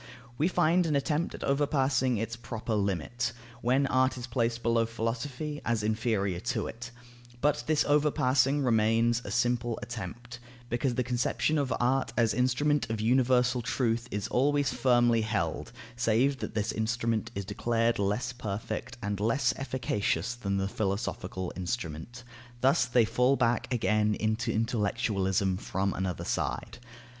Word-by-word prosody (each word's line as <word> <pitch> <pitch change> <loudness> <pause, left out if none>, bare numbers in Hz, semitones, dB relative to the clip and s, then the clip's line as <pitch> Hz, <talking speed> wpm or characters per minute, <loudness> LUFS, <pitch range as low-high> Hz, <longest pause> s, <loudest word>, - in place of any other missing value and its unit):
We 150 +6 +2
find 175 -1 +3
an 150 - +1
attempt 150 +3 0
at - - -8
overpassing 135 -3 +1
its 115 +2 -3
proper 115 -1 -5
limit, 100 +4 -1 0.3
when 130 +4 +2
art 130 0 +2
is 120 - -5
placed 120 -2 -1
below 115 0 +2
philosophy, 125 +6 -3
as 115 -2 0
inferior 110 -4 0
to - - -2
it; 120 +2 -7 0.5
but 150 +2 +1
this 155 -1 +2
overpassing 140 -2 +3
remains 115 0 +3
a - - -7
simple 120 +1 0
attempt, 120 +2 -7 0.3
because 120 +1 0
the 125 - +1
conception 125 +5 0
of 135 -3 -1
art 125 -1 +1
as 115 -2 +3
instrument 130 +1 +1
of 110 -1 -2
universal 125 +1 +3
truth 120 -1 -1
is 105 -3 -3
always 145 +2 +2
firmly 120 -3 +3
held; 100 -7 -2 0.2
save 125 +4 +2
that - - -5
this 105 +1 0
instrument 115 0 -1
is 100 - -3
declared 115 +3 0
less 105 +5 0
perfect 115 +1 -5
and 100 -1 -2
less 115 +5 +2
efficacious 120 -3 -1
than 100 -5 -2
the 95 0 0
philosophical 95 -3 -3
instrument. 95 +3 -5 0.4
Thus 135 +6 +4
they 120 -2 +3
fall 125 +4 +3
back 120 -2 0
again 105 -3 +2
into 110 +3 -1
intellectualism 100 -4 0
from 95 0 -2
another 95 -2 -3
side. - - -3
120 Hz, 145 wpm, -29 LUFS, 110-130 Hz, 0.5 s, Thus